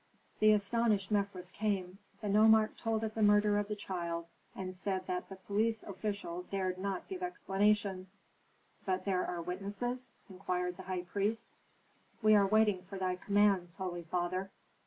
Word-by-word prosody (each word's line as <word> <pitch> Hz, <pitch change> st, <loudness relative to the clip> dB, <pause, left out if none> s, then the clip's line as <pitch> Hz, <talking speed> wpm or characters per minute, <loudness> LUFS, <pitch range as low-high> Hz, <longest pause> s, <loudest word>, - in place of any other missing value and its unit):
The 215 Hz, 0 st, +6 dB
astonished 210 Hz, -1 st, +1 dB
Mefres 200 Hz, -3 st, -1 dB
came. 195 Hz, -3 st, -2 dB, 0.2 s
The 210 Hz, -, -3 dB
nomarch 215 Hz, +1 st, +5 dB
told 225 Hz, -1 st, -1 dB
of 220 Hz, -1 st, -2 dB
the 220 Hz, -, -2 dB
murder 205 Hz, 0 st, +5 dB
of 205 Hz, -, -2 dB
the 210 Hz, -, -2 dB
child, 170 Hz, -4 st, -4 dB, 0.3 s
and 185 Hz, -1 st, -5 dB
said 185 Hz, 0 st, -2 dB
that 180 Hz, -1 st, -3 dB
the 195 Hz, -, -7 dB
police 215 Hz, +4 st, 0 dB
official 200 Hz, -4 st, -4 dB
dared 185 Hz, -2 st, -1 dB
not 195 Hz, -1 st, -3 dB
give 375 Hz, -1 st, -6 dB
explanations. 200 Hz, -, 0 dB, 0.7 s
"But 185 Hz, -1 st, 0 dB
are -, -, -18 dB
there 180 Hz, -3 st, -1 dB
witnesses?" 205 Hz, +8 st, -4 dB
inquired 180 Hz, -2 st, -3 dB
the 190 Hz, -, -8 dB
high 180 Hz, -1 st, -2 dB
priest. 205 Hz, +5 st, -1 dB, 0.8 s
"We 215 Hz, 0 st, +7 dB
are 200 Hz, -2 st, +6 dB
waiting 210 Hz, -2 st, +3 dB
for 195 Hz, +2 st, -8 dB
thy 185 Hz, -1 st, 0 dB
commands, 195 Hz, -3 st, +2 dB
holy 180 Hz, -2 st, -4 dB
father." 180 Hz, +3 st, -2 dB
195 Hz, 155 wpm, -33 LUFS, 185-210 Hz, 0.8 s, We